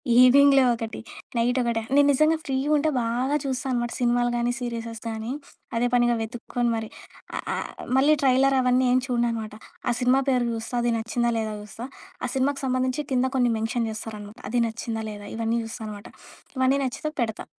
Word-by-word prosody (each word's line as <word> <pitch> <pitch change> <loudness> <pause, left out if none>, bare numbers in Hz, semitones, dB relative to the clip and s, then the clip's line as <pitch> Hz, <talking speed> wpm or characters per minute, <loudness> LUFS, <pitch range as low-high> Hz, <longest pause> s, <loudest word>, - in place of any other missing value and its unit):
ఈవినింగ్‌లో 270 +2 +7
ఒకటి 225 -1 -5 0.4
నైట్ 245 +2 +2
ఒకటి 235 -2 0
నేను 285 0 +6
నిజంగా 310 +4 +3
ఫ్రీ 270 -2 -1 0.2
ఉంటే 300 +1 +2
బాగా 245 +5 0
చూస్తా 265 0 -2
అనమాట 240 -1 -1
సినిమాలు 240 0 +2
గాని, 240 0 +1
సీరిసెస్ 230 -2 -5
గానీ. 220 +2 -4 0.5
అదే 245 +1 +2
పనిగా 240 -1 +4
వెతుక్కొని 240 +1 -2
మరి. 220 -1 -4 0.5
ఆ - - -2 0.2
ఆహ్, - - -4 0.3
మళ్ళీ 295 +3 +5
ట్రైలర్ 270 +1 +4
అవన్నీ 250 +1 +3
ఏం 255 - +4
చూడననమాట. 230 -3 -1 0.4
ఆ 240 - +3
సినిమా 255 +2 +4
పేరు 250 -2 +2
చూస్తా 225 +2 -5
అది 240 - +2
నచ్చిందా 235 +1 0
లేదా 220 -1 -2
చూస్తా? 210 +4 -8 0.4
ఆ 250 - -2
సినిమాకు 275 +2 +1
సంబంధించి 255 +2 0
కింద 255 0 +3
కొన్ని 245 -1 +3
మెన్షన్ 225 +1 -1
జేస్తారనమాట. 215 0 -8
అది 240 +1 +1
నచ్చిందా 225 0 -4
లేదా 205 -1 -9
ఇవన్నీ 230 +1 0
చూస్తా 225 0 -7
అనమాట. 205 -1 -8 0.5
ఇవన్నీ 260 +2 +3
నచ్చితే 305 +4 -3
పెడతా. 220 -1 -2
240 Hz, 170 wpm, -25 LUFS, 225-255 Hz, 0.5 s, ఈవినింగ్‌లో